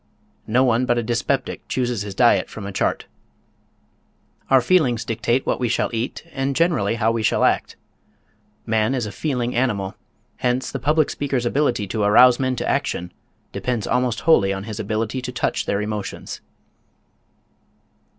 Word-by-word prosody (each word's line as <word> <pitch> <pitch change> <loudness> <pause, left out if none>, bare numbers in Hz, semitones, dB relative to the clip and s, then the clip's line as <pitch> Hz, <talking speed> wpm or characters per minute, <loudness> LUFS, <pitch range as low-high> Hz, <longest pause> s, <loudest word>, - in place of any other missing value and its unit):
No 120 +4 +3
one 125 0 +2
but 120 - +2
a 120 - 0
dyspeptic 120 +4 -2
chooses 125 -4 -1
his 100 -1 -6
diet 120 +1 +3
from 110 - -8
a 100 - -5
chart. 95 - -1 1.4
Our 135 - +6
feelings 125 -4 +2
dictate 120 +3 0
what - - 0
we 125 -2 0
shall 120 - 0
eat 115 +3 -3
and 135 0 -2
generally 155 - +2
how 115 0 +1
we 115 -1 -1
shall 110 - +1
act. - - +1 0.9
Man 110 +3 +1
is 125 -4 -1
a 105 - -5
feeling 125 -1 -2
animal, 105 -6 -1 0.4
hence 125 +1 -1
the 135 - -4
public 150 +4 +2
speaker's 135 -4 -2
ability 135 -4 +1
to 110 - -2
arouse 120 +4 +6
men 130 -1 0
to - - -3
action 90 0 -1 0.4
depends 125 -5 -2
almost 125 -2 0
wholly 100 -12 +4
on 95 0 -3
his 110 0 -6
ability 110 +4 -2
to 125 - -5
touch 125 - -2
their 100 - 0
emotions. 105 -1 -5
120 Hz, 160 wpm, -22 LUFS, 110-130 Hz, 1.4 s, Our